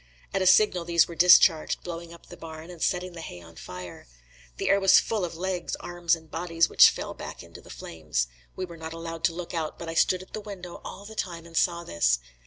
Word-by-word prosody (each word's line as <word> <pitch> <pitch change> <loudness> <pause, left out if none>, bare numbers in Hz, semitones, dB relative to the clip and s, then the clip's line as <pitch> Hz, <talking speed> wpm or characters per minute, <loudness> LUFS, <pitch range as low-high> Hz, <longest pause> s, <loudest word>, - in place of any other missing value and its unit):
At 195 - 0
a 185 - +2
signal 185 -2 +5
these 170 -1 +3
were 170 - -8
discharged, 170 -2 +5
blowing 170 -1 -7
up 170 - -14
the - - -11
barn 160 +1 -9
and 170 -2 -12
setting 180 -1 -1
the 165 - -8
hay 90 - -8
on 85 -1 -15
fire. 90 -6 -9 0.5
The - - -2
air 200 - +4
was 195 -1 +7
full 220 -4 -2
of 170 -1 -4
legs, 185 0 -2
arms 175 -1 0
and 160 -1 -15
bodies, 165 -1 +1
which - - +8
fell - - -5
back - - -8
into - - -13
the - - -17
flames. 75 -7 -3 0.3
We 185 - -3
were 170 -2 -11
not 160 0 -7
allowed 165 0 -7
to 165 - +2
look 180 0 -6
out, 160 -2 -3
but 170 - -7
I - - -4
stood 185 +2 +2
at - - -20
the 215 - -4
window 185 -4 -9
all 200 - -9
the 220 - -9
time 170 -5 -4
and 165 0 -13
saw 170 0 +1
this. 60 - +2
170 Hz, 240 wpm, -27 LUFS, 160-180 Hz, 0.5 s, which